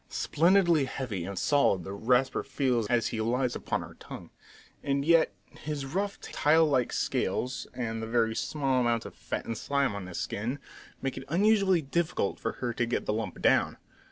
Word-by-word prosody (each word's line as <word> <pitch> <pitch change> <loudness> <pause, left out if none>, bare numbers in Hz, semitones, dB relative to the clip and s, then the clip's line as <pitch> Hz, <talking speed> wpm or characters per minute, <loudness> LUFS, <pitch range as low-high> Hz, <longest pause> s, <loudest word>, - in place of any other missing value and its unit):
Splendidly 170 -3 +3
heavy 115 -10 -4
and 100 0 -6
solid 100 -6 +2
the 95 - -6
Rasper 125 +5 +1
feels 130 -5 0
as 120 0 +1
he 110 - -3
lies 125 +2 0
upon - - -2
her - - -11
tongue! - - -10 0.5
And 140 0 0
yet 165 -7 +5 0.3
his 150 -2 -4
rough, 195 +8 -2
tile 160 +2 +3
like 130 -5 +1
scales, 130 +2 -1
and 115 -2 -3
the 110 - -4
very 115 -1 +1
small 135 -2 0
amount 120 -1 +1
of - - -8
fat - - -5
and 115 - -3
slime 140 +1 0
on 100 -2 -6
his 90 - -7
skin, 120 +7 -3 0.5
make 135 -1 -2
it - - -9
unusually 195 -1 +3
difficult 145 -7 -1
for 115 - -2
her 120 -2 -3
to 120 0 -1
get 120 - -1
the - - 0
lump 105 -4 -4
down. - - +3
130 Hz, 185 wpm, -29 LUFS, 115-150 Hz, 0.5 s, yet